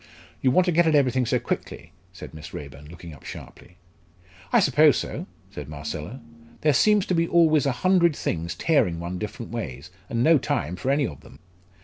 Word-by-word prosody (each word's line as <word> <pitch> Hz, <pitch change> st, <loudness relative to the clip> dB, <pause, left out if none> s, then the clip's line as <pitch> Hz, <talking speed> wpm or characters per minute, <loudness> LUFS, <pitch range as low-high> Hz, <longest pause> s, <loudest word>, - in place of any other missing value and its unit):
"You 130 Hz, -, +3 dB
want 180 Hz, +8 st, +3 dB
to 180 Hz, -, +1 dB
get 170 Hz, 0 st, +3 dB
at 155 Hz, -, +3 dB
everything 130 Hz, -3 st, +2 dB
so -, -, +2 dB
quickly?" -, -, -5 dB, 0.2 s
said -, -, -11 dB
Miss 80 Hz, 0 st, -10 dB
Raeburn, 70 Hz, 0 st, -9 dB
looking 85 Hz, -1 st, -11 dB
up 75 Hz, -, -15 dB
sharply. 85 Hz, -, -11 dB, 0.7 s
"I -, -, +5 dB
suppose 150 Hz, +2 st, +4 dB
so!" -, -, -5 dB, 0.2 s
said -, -, -8 dB
Marcella. 75 Hz, -, -6 dB, 0.4 s
"There 150 Hz, -1 st, +3 dB
seems 210 Hz, +6 st, +3 dB
to -, -, -1 dB
be 165 Hz, -1 st, +1 dB
always 155 Hz, -5 st, +3 dB
a -, -, +2 dB
hundred 175 Hz, -4 st, +4 dB
things 85 Hz, -, -3 dB
tearing 115 Hz, -, +1 dB
one 85 Hz, +1 st, -5 dB
different 110 Hz, +3 st, -6 dB
ways, 85 Hz, -, -6 dB, 0.2 s
and 115 Hz, 0 st, 0 dB
no 160 Hz, 0 st, +5 dB
time 85 Hz, -, -2 dB
for 95 Hz, +9 st, -4 dB
any 140 Hz, +1 st, +2 dB
of 75 Hz, -, -7 dB
them." -, -, -16 dB
125 Hz, 195 wpm, -24 LUFS, -, 0.7 s, I